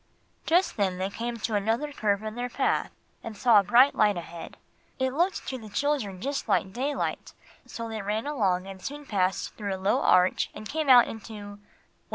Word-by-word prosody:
Just 350 -2 +2
then 190 -3 0
they 190 +2 -2
came 235 +2 -4
to 225 0 -3
another 225 +8 0
curve 205 -4 0
in 215 0 -4
their 245 +2 -4
path, - - 0 0.3
and 225 -2 -7
saw 230 -1 +6
a - - +1
bright 245 +8 +5
light 210 -3 +3
ahead. 170 -1 -8 0.4
It 260 -1 -1
looked 350 +6 0
to 260 - -4
the 220 -2 -11
children 235 -6 -1
just 275 +6 -3
like 190 - +1
daylight; 275 +4 -3 0.3
so 230 0 -6
they 220 -1 -5
ran 210 +4 -2
along 195 -11 0
and 195 -1 -9
soon 290 +5 -7
passed 190 -5 -1
through 200 -3 -4
a - - -7
low 190 +2 +1
arch 180 0 +3
and 215 0 -7
came 310 +3 -2
out 245 -2 +8
into 225 0 -8
Well! 205 0 -11
220 Hz, 200 wpm, -27 LUFS, 200-260 Hz, 0.4 s, out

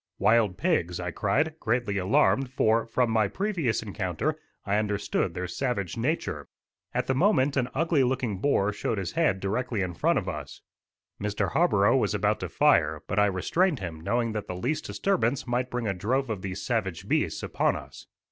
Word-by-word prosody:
"Wild 110 -4 +3
pigs," 90 - 0
I 90 -1 -3
cried, 155 - 0
greatly 115 -4 0
alarmed, 130 +6 +3
for, 115 -3 +2
from 120 0 +1
my 110 -2 +3
previous 170 - -1
encounter, 105 - -2 0.3
I 100 0 +1
understood 105 -4 -1
their 90 0 -3
savage 100 -3 -2
nature. 140 +9 -2 0.4
At 125 +1 -1
the 130 - +1
moment 145 -3 +3
an 125 -2 0
ugly 160 -1 +2
looking 125 -6 -1
boar 105 -5 +2
showed 110 +1 -2
his 95 -3 -3
head 160 - +1
directly 110 +3 -1
in 90 -1 -3
front - - +1
of - - -2
us. - - -6 0.6
Mr. 105 -3 -1
Harborough - - +3
was - - +1
about - - +1
to - - -4
fire, - - +3
but 105 - 0
I 105 - +5
restrained 150 - +1
him, 85 -6 -6
knowing 115 +6 0
that 105 -1 -4
the 90 - -4
least 125 - -2
disturbance 140 - 0
might 125 0 -1
bring 125 -1 -3
a 100 - 0
drove 120 +7 -1
of 100 -4 -4
these 95 0 -5
savage 105 -9 -2
beasts - - 0
upon - - +1
us. - - -10
115 Hz, 185 wpm, -27 LUFS, 100-130 Hz, 0.6 s, I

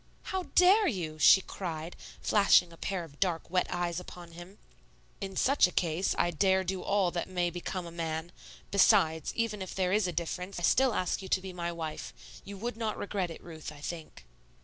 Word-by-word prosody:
"How 375 -1 -2
dare 385 +3 +6
you?" 165 - -3
she 190 - +7
cried, 170 -3 -6 0.3
flashing 195 -4 +4
a - - -11
pair 185 +2 -3
of 145 -3 -14
dark, 175 -4 0
wet 180 0 +2
eyes 175 -1 -2
upon 175 -1 -11
him. 175 +4 -12 0.6
"In 195 -1 -5
such 270 0 +4
a - - -7
case, 170 +1 0
'I 175 - +2
dare 190 +3 +2
do 185 0 -3
all 200 -3 +1
that 175 +1 -3
may 175 -2 0
become 175 +1 -4
a 170 - -8
man.' 165 0 -4 0.4
Besides, 190 -6 +4
even 225 -3 -1
if 190 - -6
there 185 -1 +1
is 210 -2 +2
a - - -2
difference, 180 +3 -4
I - - -7
still 260 +4 +3
ask 180 - -1
you 190 - -7
to - - +3
be 190 0 -8
my 170 -1 -3
wife. 160 -2 -6 0.3
You 200 0 -8
would 235 +3 -4
not 220 -2 -2
regret 195 -3 -2
it, 165 - -10
Ruth, 160 -3 -8
I 150 - -12
think." 160 - -7
180 Hz, 205 wpm, -30 LUFS, 170-200 Hz, 0.6 s, she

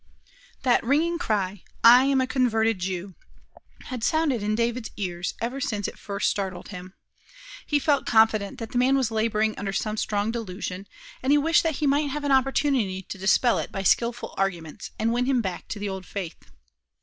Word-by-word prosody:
That 250 -2 +3
ringing 320 +7 +1
cry, 200 - -1 0.2
"I 245 +3 +8
am 275 -1 +3
a - - +2
converted 225 -5 +1
Jew," 185 +1 -4 0.7
had 250 -3 -6
sounded 300 -5 +1
in 210 +1 0
David's 235 0 -1
ears 180 -3 -3
ever 250 +4 -3
since 210 -7 -1
it - - -9
first 200 0 -2
startled 190 -3 -3
him. 185 -1 -9 0.7
He 295 - +2
felt 285 -1 +1
confident 220 -3 +3
that 225 -2 -7
the 245 - +1
man 265 +2 +4
was 255 -4 0
laboring 220 -1 +1
under 200 -1 -3
some 215 +1 -2
strong 210 0 0
delusion, 195 -4 -5 0.3
and 265 - +1
he 295 - +6
wished 325 +3 +4
that 325 -3 -1
he 300 - -1
might 285 +1 +2
have 295 +2 -4
an 285 - 0
opportunity 265 -7 +1
to 195 - -8
dispel 215 +5 +3
it - - -5
by 195 - -4
skillful 235 +5 +1
arguments, 175 -5 -3
and 230 +1 +1
win 250 +1 0
him 265 -2 +2
back 190 -6 -4
to - - -5
the 205 0 -3
old 190 -1 -6
faith. 190 -5 -6
225 Hz, 190 wpm, -25 LUFS, 195-265 Hz, 0.7 s, I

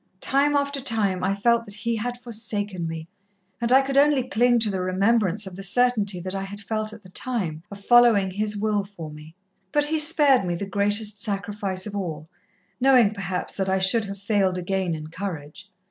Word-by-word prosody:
Time 280 +5 +1
after 280 -1 -1
time, 205 -7 0
I 195 +1 +1
felt 235 +3 +2
that 205 -2 -8
He 230 +2 -2
had 245 +3 -4
forsaken 210 -6 -3
me, 160 0 -6 0.5
and 235 +1 0
I 265 +1 +6
could 275 0 +2
only 285 -2 +3
cling 240 +2 +3
to 215 -2 +1
the 190 -1 -2
remembrance 200 +2 +1
of 190 -2 -8
the 195 - -8
certainty 205 -2 +1
that 185 +1 -5
I 195 - -3
had 200 +1 -7
felt 215 +1 -3
at 215 0 -12
the 185 - -14
time, 185 -10 -3
of 200 0 -11
following 235 -6 +5
His 210 +2 -2
will 210 -1 0
for 175 -6 -10
me. 150 +2 -13 0.4
But 295 0 +3
He 315 +1 +1
spared 295 -6 +4
me 175 -2 -2
the 200 - -4
greatest 205 +1 -1
sacrifice 200 -2 -2
of 205 -1 -6
all, 160 -6 -5 0.5
knowing, 255 -5 +5
perhaps, 190 -3 -4
that 190 -1 -1
I 190 - +2
should 195 +4 +4
have 200 0 -7
failed 200 -2 0
again 180 -1 -2
in 155 -1 -7
courage. 180 0 -7
205 Hz, 200 wpm, -24 LUFS, 190-235 Hz, 0.5 s, I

